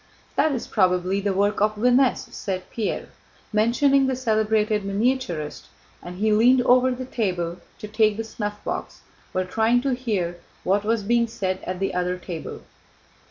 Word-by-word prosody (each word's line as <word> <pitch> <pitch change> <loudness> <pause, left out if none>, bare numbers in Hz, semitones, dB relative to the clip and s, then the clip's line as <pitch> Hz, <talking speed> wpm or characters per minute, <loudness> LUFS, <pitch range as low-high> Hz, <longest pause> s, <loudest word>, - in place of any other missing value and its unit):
"That 315 - +3
is 250 - -3
probably 185 -1 +1
the 200 0 0
work 200 +2 +1
of 215 0 +2
Vinesse," 250 +4 +2
said 185 -2 -5
Pierre, 220 -3 -3 0.4
mentioning 265 +5 +3
a 260 - 0
celebrated 215 -3 +1
miniaturist, 200 - -1 0.3
and 180 +1 -8
he 215 +2 +2
leaned 245 +4 +5
over 255 +1 +5
the 255 0 -3
table 180 -8 -2 0.2
to 210 - -7
take 215 0 +2
the 225 - -2
snuffbox 210 -2 -5 0.3
while 185 0 -1
trying 225 +6 +2
to 275 -2 +1
hear 200 -9 -2 0.2
what 200 +2 +1
was 220 0 0
being 235 +2 +2
said 190 -4 -3
at 185 0 -3
the 195 - -1
other 180 0 -1
table. 175 -3 -7
210 Hz, 160 wpm, -24 LUFS, 185-240 Hz, 0.4 s, leaned